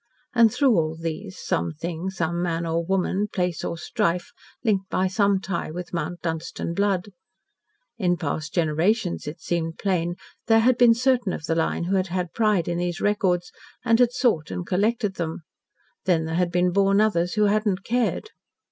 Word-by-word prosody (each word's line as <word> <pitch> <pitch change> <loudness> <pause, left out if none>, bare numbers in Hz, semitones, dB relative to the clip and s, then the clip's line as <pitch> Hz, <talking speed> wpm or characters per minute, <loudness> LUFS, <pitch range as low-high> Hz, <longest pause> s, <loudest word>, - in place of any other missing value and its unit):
And, 230 -2 +5
through 270 -3 +3
all 160 -1 0
these, 170 +4 -5
some 85 0 -1
thing, 170 - -4
some 175 -2 -2
man 170 -1 -1
or 165 +1 0
woman, 190 +3 0
place, 180 -4 -2
or 170 - -3
strife 170 +2 -1 0.3
linked 195 -5 +1
by 185 - +1
some 200 +1 +2
tie 190 -4 -3
with 175 +3 -7
Mount 170 +1 -3
Dunstan 165 0 -3
blood. 200 +1 0 0.9
In 175 -3 +2
past 155 -1 -3
generations, 175 +4 0
it 150 +3 -6
seemed 165 -1 -2
plain, 175 -3 0 0.3
there 225 0 +5
had 250 +2 +4
been 235 -2 +7
certain 245 -4 +1
of - - -5
the 165 - 0
line 165 +1 0
who 190 +3 +1
had 185 0 0
had 180 -1 -3
pride 210 -6 +2
in 175 0 -1
these 175 0 -2
records, 185 -4 +1 0.3
and 230 -1 +4
had 245 -1 +5
sought 230 - +1
and 90 -1 -4
collected 210 +1 0
them; 165 -1 -4 0.6
then 165 -3 +2
had 170 +2 0
been 180 0 +2
born 195 +1 +3
others 180 -5 +2
who 210 - +2
had 210 +1 +2
not 195 -1 0
cared. 245 - -1
180 Hz, 180 wpm, -24 LUFS, 170-205 Hz, 0.9 s, been